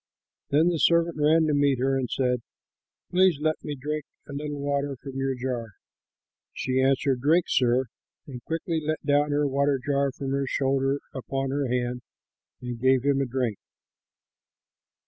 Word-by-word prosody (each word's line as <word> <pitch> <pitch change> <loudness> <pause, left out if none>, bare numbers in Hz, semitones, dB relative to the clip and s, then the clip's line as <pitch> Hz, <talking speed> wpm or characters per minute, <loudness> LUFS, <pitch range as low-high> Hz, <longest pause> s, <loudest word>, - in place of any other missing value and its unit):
Then 155 +5 +4
the 170 -2 -1
servant 170 0 +3
ran 155 +2 +4
to 155 - +1
meet 140 -2 +3
her 135 +2 +1
and 130 -2 -1
said, 125 -2 0 0.7
"Please 185 -3 +4
let 155 +1 -1
me 150 - -4
drink 150 +3 -3 0.2
a 145 - -8
little 145 0 -4
water 140 0 -1
from 135 0 -9
your 135 0 -1
jar." 125 -4 -4 0.8
She 130 0 0
answered, 135 -1 +2
"Drink, 160 +5 +3
sir," 125 +1 +2 0.4
and 125 -4 -9
quickly 165 +2 -2
let 155 0 -2
down 145 +1 +3
her 145 0 +1
water 140 +1 +1
jar 140 +1 0
from 135 0 -5
her 140 0 0
shoulder 135 +1 0
upon 135 +1 -3
her 140 0 0
hand 125 0 -1 0.6
and 120 -2 -5
gave 130 -1 +4
him 140 -1 +2
a 135 - -1
drink. 120 -4 -2
140 Hz, 165 wpm, -26 LUFS, 130-150 Hz, 0.8 s, Then